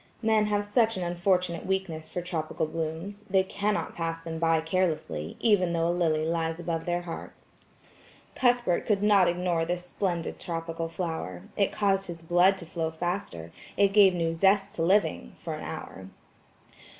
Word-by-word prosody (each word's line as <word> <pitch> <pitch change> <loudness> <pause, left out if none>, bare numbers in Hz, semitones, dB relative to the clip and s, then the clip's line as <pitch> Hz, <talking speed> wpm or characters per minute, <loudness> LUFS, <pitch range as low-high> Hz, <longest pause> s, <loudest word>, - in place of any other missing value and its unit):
Men 220 -1 +3
have 205 0 0
such 225 0 +2
an 185 - -2
unfortunate 175 0 0
weakness 185 -5 -2
for 180 - -4
tropical 160 -3 -2
blooms, 165 +6 -5
they 190 0 +4
cannot 205 +2 -2
pass 165 -1 -2
them 165 -1 -5
by 165 -1 +3
carelessly, 160 - -1
even 190 -7 +3
though 165 0 +1
a 170 - +1
lily 160 -3 +1
lies 165 0 -1
above 165 -1 -3
their 175 0 0
hearts. 170 -1 -10 0.7
Cuthbert 245 -8 +2
could 205 -2 +2
not 200 -3 +5
ignore 175 -1 0
this 175 +1 -3
splendid 180 -3 -3
tropical 165 -1 -4
flower; 160 - -4
it 200 - +2
caused 195 -2 +1
his 165 -1 -8
blood 175 +3 +4
to 180 - -8
flow 165 -1 -2
faster, 160 - -4 0.3
it 200 -1 +4
gave 195 -3 +6
new 165 -1 0
zest 195 +3 +3
to - - -4
living–for 165 - 0
an - - -6
hour. 95 0 -7
175 Hz, 160 wpm, -28 LUFS, 165-195 Hz, 0.7 s, gave